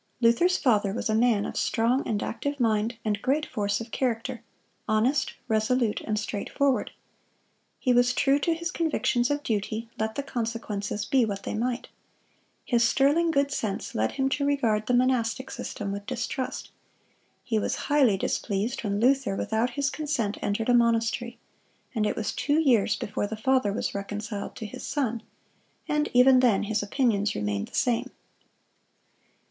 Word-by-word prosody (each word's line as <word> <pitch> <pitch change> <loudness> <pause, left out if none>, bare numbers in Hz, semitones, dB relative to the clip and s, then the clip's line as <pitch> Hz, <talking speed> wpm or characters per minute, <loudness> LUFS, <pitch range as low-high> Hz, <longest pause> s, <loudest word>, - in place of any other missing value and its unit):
Luther's 250 +11 +4
father 210 -7 +2
was 225 0 -2
a - - +1
man 220 -2 +3
of - - -5
strong 240 +4 +1
and 210 -2 -1
active 285 +4 -3
mind 225 0 +1
and 210 -1 0
great 295 +4 +1
force 205 -1 -1
of 230 0 -8
character, 245 -1 -2 0.5
honest, 240 +6 +1
resolute, 220 0 +1
and 215 -1 -2
straight 210 -1 -3
forward. 280 -2 +1 0.9
He 250 - +1
was 245 0 +4
true 275 +1 +3
to 330 +3 +1
his 340 +2 -4
convictions 280 -8 +1
of 290 0 -1
duty, 220 +1 -2
let 220 0 -1
the 280 - -2
consequences 225 -5 -3
be 265 -2 +3
what 200 -3 -3
they - - -4
might. 245 +3 -2 0.8
His 240 -2 +2
sterling 285 +7 +3
good 280 -3 +1
sense 215 -7 -3
led 110 +1 0
him 270 -1 0
to 280 +1 -1
regard 230 -7 +1
the 250 - +3
monastic 255 0 +1
system 200 -2 -5
with 200 0 -6
distrust. 255 +1 -4 0.7
He 225 -3 0
was - - -1
highly 270 -9 +4
displeased 210 +7 -2
when 200 -1 -1
Luther, 260 -2 +2
without 220 +4 0
his 275 +3 -1
consent, 270 -9 -2
entered 215 +3 -1
a - - +5
monastery; 235 0 +1 0.6
and 215 -3 +1
it - - -1
was 215 - -2
two 290 +2 +1
years 235 -9 +3
before 205 0 -3
the 220 - -5
father 255 -1 +2
was 205 - -2
reconciled 205 +1 -5
to 220 - -6
his 210 - -8
son, 240 -6 -2 0.7
and 300 0 0
even 255 +1 +6
then 240 -6 +3
his 210 0 -1
opinions 205 -1 +1
remained 105 -1 -2
the - - -11
same. 240 -2 +1
235 Hz, 165 wpm, -27 LUFS, 210-265 Hz, 0.9 s, even